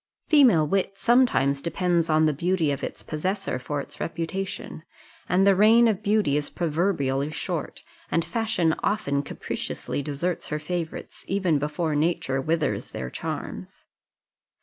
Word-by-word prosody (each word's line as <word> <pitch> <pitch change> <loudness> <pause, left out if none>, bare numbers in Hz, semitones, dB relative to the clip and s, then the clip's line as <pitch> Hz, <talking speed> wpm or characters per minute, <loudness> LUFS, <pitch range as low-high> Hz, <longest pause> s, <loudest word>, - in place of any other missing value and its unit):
Female 255 - +6
wit 195 +4 0
sometimes 215 - +3
depends 170 0 0
on 155 0 +4
the 155 - +2
beauty 170 0 +1
of 140 - -4
its - - -5
possessor 185 -1 -2
for 145 +3 -3
its - - -11
reputation; 170 +1 -4 0.5
and 185 +2 +4
the 200 -1 +6
reign 225 +4 +6
of 210 -4 0
beauty 200 -9 +2
is 150 - -2
proverbially 150 -5 0
short, 155 - -4 0.3
and 165 - +1
fashion 180 -4 +1
often 140 -10 0
capriciously 145 - -4
deserts 150 +5 -2
her 150 - -2
favourites, 165 +1 -5
even 185 -6 +1
before 150 +2 -1
nature 145 -3 0
withers 160 +2 -1
their 65 0 -5
charms. - - -6
165 Hz, 140 wpm, -25 LUFS, 150-195 Hz, 0.5 s, Female